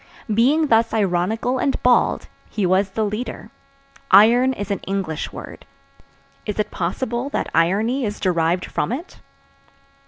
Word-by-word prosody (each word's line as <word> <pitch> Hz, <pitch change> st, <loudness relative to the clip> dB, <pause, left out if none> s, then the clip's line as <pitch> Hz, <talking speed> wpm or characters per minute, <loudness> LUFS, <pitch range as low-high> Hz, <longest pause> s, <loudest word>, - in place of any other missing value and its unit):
Being 275 Hz, +9 st, +3 dB
thus 225 Hz, 0 st, +3 dB
ironical 215 Hz, +6 st, 0 dB
and 275 Hz, -, 0 dB
bald, 250 Hz, -1 st, +2 dB, 0.2 s
he 210 Hz, -3 st, -2 dB
was 190 Hz, +2 st, +2 dB
the 215 Hz, +3 st, -1 dB
leader. 215 Hz, +1 st, -5 dB, 0.6 s
Iron 235 Hz, +6 st, +6 dB
is 205 Hz, -3 st, -5 dB
an 200 Hz, -, -1 dB
English 190 Hz, -5 st, -3 dB
word. -, -, -10 dB, 0.8 s
Is 210 Hz, -, -3 dB
it 210 Hz, -, -1 dB
possible 235 Hz, +8 st, -3 dB
that -, -, -3 dB
irony 210 Hz, +11 st, +1 dB
is 210 Hz, -2 st, -3 dB
derived 175 Hz, -1 st, 0 dB
from -, -, -2 dB
it? 295 Hz, +9 st, -6 dB
215 Hz, 135 wpm, -21 LUFS, 190-245 Hz, 0.8 s, Iron